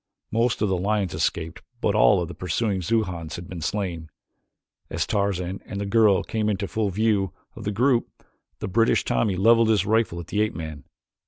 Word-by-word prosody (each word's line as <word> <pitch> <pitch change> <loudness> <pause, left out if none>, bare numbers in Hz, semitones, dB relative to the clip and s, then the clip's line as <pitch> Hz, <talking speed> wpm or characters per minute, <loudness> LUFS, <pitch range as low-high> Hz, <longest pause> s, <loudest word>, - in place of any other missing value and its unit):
Most 115 0 +1
of - - +3
the 95 -1 0
lions 100 -2 0
escaped 85 +1 -2 0.2
but 105 - +1
all 105 -3 +4
of - - -5
the 85 - -8
pursuing 95 +3 -1
Xujans 90 -5 -1
had 85 0 -8
been 90 -3 -7
slain. 85 -2 -3 0.8
As - - -1
Tarzan 95 -2 -1
and 100 - -5
the 100 - -2
girl 105 -2 +4
came 110 -1 -1
into 100 -1 -1
full 105 +2 -1
view 100 -2 +1 0.2
of - - -9
the 105 - 0
group, 120 +3 +2 0.5
a - - -3
British 115 +4 +2
Tommy 100 -4 +1
leveled 115 +4 +4
his 105 -4 +3
rifle 110 -5 +1
at 85 - -7
the 105 +5 -1
ape 110 - 0
man. 80 -4 -7
100 Hz, 190 wpm, -24 LUFS, 90-110 Hz, 0.8 s, all